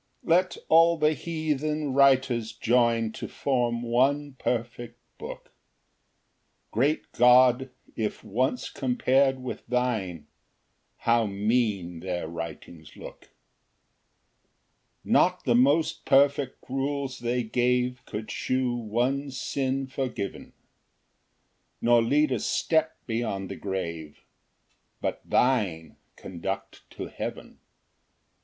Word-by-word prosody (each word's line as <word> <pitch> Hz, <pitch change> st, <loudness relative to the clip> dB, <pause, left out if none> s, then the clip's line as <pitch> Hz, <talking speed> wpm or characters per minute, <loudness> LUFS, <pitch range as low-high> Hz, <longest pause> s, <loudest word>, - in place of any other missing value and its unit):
1 -, -, -11 dB
Let 185 Hz, +1 st, +1 dB
all 165 Hz, +1 st, +5 dB
the 155 Hz, 0 st, +3 dB
heathen 155 Hz, -2 st, -2 dB
writers 130 Hz, -4 st, +3 dB
join 115 Hz, -1 st, +2 dB
To -, -, -6 dB
form 120 Hz, -3 st, -1 dB
one 135 Hz, +4 st, +1 dB
perfect 120 Hz, 0 st, -3 dB, 0.2 s
book, -, -, -9 dB, 1.2 s
Great 140 Hz, +8 st, 0 dB
God, 125 Hz, +1 st, +5 dB, 0.3 s
if 110 Hz, -2 st, -3 dB
once 125 Hz, +4 st, -1 dB
compar'd 130 Hz, +1 st, +2 dB
with 125 Hz, -, -6 dB
thine, 110 Hz, -11 st, -1 dB, 0.7 s
How 115 Hz, -1 st, +2 dB
mean 100 Hz, -4 st, 0 dB
their 90 Hz, -2 st, -3 dB
writings 85 Hz, -1 st, -8 dB
look! -, -, -11 dB, 1.7 s
2 -, -, -13 dB
Not -, -, +3 dB
the 120 Hz, -, +2 dB
most 140 Hz, +7 st, +3 dB
perfect 140 Hz, -1 st, +2 dB
rules 135 Hz, 0 st, -2 dB
they 120 Hz, +1 st, -1 dB
gave 125 Hz, +2 st, 0 dB
Could 110 Hz, +1 st, -6 dB
shew 130 Hz, -1 st, -1 dB
one 120 Hz, +5 st, -1 dB
sin 135 Hz, +1 st, -2 dB
forgiven, 130 Hz, -6 st, -5 dB, 1.3 s
Nor 120 Hz, 0 st, +4 dB
lead 145 Hz, +5 st, +2 dB
a 125 Hz, -, 0 dB
step 160 Hz, +6 st, 0 dB
beyond 110 Hz, -5 st, -3 dB
the -, -, -5 dB
grave; 85 Hz, -6 st, -5 dB, 0.8 s
But -, -, -3 dB
thine 95 Hz, -, 0 dB, 0.2 s
conduct 95 Hz, +2 st, -6 dB
to -, -, -7 dB
heaven. -, -, -7 dB
125 Hz, 105 wpm, -27 LUFS, 110-135 Hz, 1.7 s, all